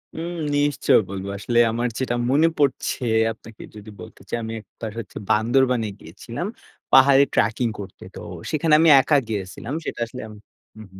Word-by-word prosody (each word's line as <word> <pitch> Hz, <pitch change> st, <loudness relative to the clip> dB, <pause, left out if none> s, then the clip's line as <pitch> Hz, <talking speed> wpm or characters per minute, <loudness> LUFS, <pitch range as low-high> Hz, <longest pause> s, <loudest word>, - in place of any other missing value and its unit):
হুম, 170 Hz, +2 st, -5 dB, 0.2 s
নিশ্চয় 145 Hz, 0 st, +3 dB
বলব। 95 Hz, -1 st, -5 dB
আসলে 120 Hz, +4 st, 0 dB
আমার 120 Hz, +2 st, -1 dB
যেটা 125 Hz, -2 st, -1 dB
মনে 150 Hz, +5 st, +4 dB
পরছে, 140 Hz, -2 st, 0 dB, 0.3 s
আপনাকে 110 Hz, 0 st, -14 dB
যদি 105 Hz, 0 st, -11 dB
বলতে -, -, -12 dB
চাই -, -, -1 dB
আমি 110 Hz, 0 st, -5 dB
১ 105 Hz, -, -15 dB, 0.2 s
বার 110 Hz, -2 st, -4 dB
হচ্ছে 115 Hz, -, -9 dB
বান্দরবানে 120 Hz, +1 st, +2 dB
গিয়েছিলাম, 115 Hz, -, -7 dB, 0.4 s
পাহাড়ে 135 Hz, +1 st, +7 dB
ট্র্যাকিং 115 Hz, +3 st, +1 dB
করতে। 95 Hz, -2 st, -9 dB
তো -, -, -7 dB, 0.3 s
সেখানে 155 Hz, 0 st, +1 dB
আমি 165 Hz, 0 st, +5 dB
একা 150 Hz, -, +1 dB
গিয়েছিলাম 105 Hz, +4 st, -5 dB
সেটা -, -, -5 dB
আসলে 125 Hz, +2 st, -9 dB, 0.6 s
উ -, -, -9 dB
হু, 95 Hz, -, -13 dB
120 Hz, 165 wpm, -22 LUFS, 110-140 Hz, 0.6 s, পাহাড়ে